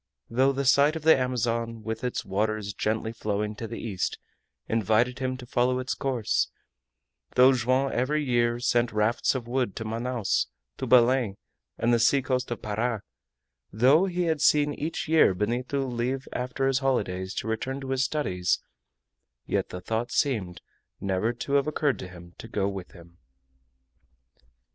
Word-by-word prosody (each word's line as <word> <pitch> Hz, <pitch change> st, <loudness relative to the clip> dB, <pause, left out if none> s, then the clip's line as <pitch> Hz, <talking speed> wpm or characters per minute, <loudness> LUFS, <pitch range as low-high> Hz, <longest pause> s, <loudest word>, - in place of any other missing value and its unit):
Though 130 Hz, +4 st, +3 dB
the 140 Hz, 0 st, -2 dB
sight 140 Hz, +4 st, +5 dB
of 160 Hz, -, -5 dB
the 160 Hz, 0 st, +7 dB
Amazon, 115 Hz, -3 st, -1 dB
with 110 Hz, +1 st, -4 dB
its 125 Hz, -, -2 dB
waters 105 Hz, +1 st, -1 dB
gently 110 Hz, +2 st, -1 dB
flowing 105 Hz, -1 st, -2 dB
to 115 Hz, -, -5 dB
the 115 Hz, -, -6 dB
east, 100 Hz, -6 st, -3 dB, 0.5 s
invited 115 Hz, +3 st, +1 dB
him 130 Hz, -1 st, -2 dB
to 125 Hz, -, -10 dB
follow 125 Hz, +1 st, +1 dB
its 130 Hz, 0 st, -2 dB
course; 125 Hz, -5 st, 0 dB, 0.9 s
though 130 Hz, +1 st, +7 dB
Joam 130 Hz, +2 st, +1 dB
every 150 Hz, +5 st, 0 dB
year 120 Hz, -2 st, +1 dB
sent 120 Hz, -1 st, +1 dB
rafts 105 Hz, +5 st, +1 dB
of 120 Hz, -3 st, -4 dB
wood 125 Hz, -4 st, -1 dB
to 110 Hz, -, -5 dB
Manaos, 115 Hz, -, -1 dB, 0.3 s
to -, -, -3 dB
Belem, 125 Hz, -4 st, +4 dB, 0.4 s
and 120 Hz, +1 st, +2 dB
the 120 Hz, -, +4 dB
seacoast 130 Hz, +1 st, +2 dB
of 120 Hz, -, -5 dB
Para; 110 Hz, +1 st, -1 dB, 0.7 s
though 135 Hz, -, +4 dB
he 180 Hz, -1 st, -1 dB
had 160 Hz, -3 st, 0 dB
seen 150 Hz, -1 st, +4 dB
each 160 Hz, +3 st, -4 dB
year 155 Hz, -, +5 dB
Benito 125 Hz, +7 st, -1 dB
leave 125 Hz, +2 st, -2 dB
after 125 Hz, +2 st, -2 dB
his 135 Hz, -1 st, +2 dB
holidays 95 Hz, -9 st, -1 dB
to -, -, -3 dB
return 130 Hz, +5 st, -2 dB
to 135 Hz, 0 st, -5 dB
his 135 Hz, 0 st, +1 dB
studies, 95 Hz, -12 st, 0 dB, 0.9 s
yet -, -, -1 dB
the 90 Hz, -, -7 dB
thought 115 Hz, +5 st, -2 dB
seemed 100 Hz, -11 st, 0 dB, 0.4 s
never 100 Hz, +4 st, 0 dB
to 125 Hz, +3 st, -5 dB
have 140 Hz, +1 st, +3 dB
occurred 150 Hz, -2 st, 0 dB
to 95 Hz, -, -6 dB
him 85 Hz, -1 st, -13 dB
to -, -, -8 dB
go 100 Hz, -3 st, -1 dB
with 95 Hz, -2 st, -6 dB
him. 85 Hz, -1 st, -16 dB
120 Hz, 160 wpm, -27 LUFS, 110-135 Hz, 0.9 s, the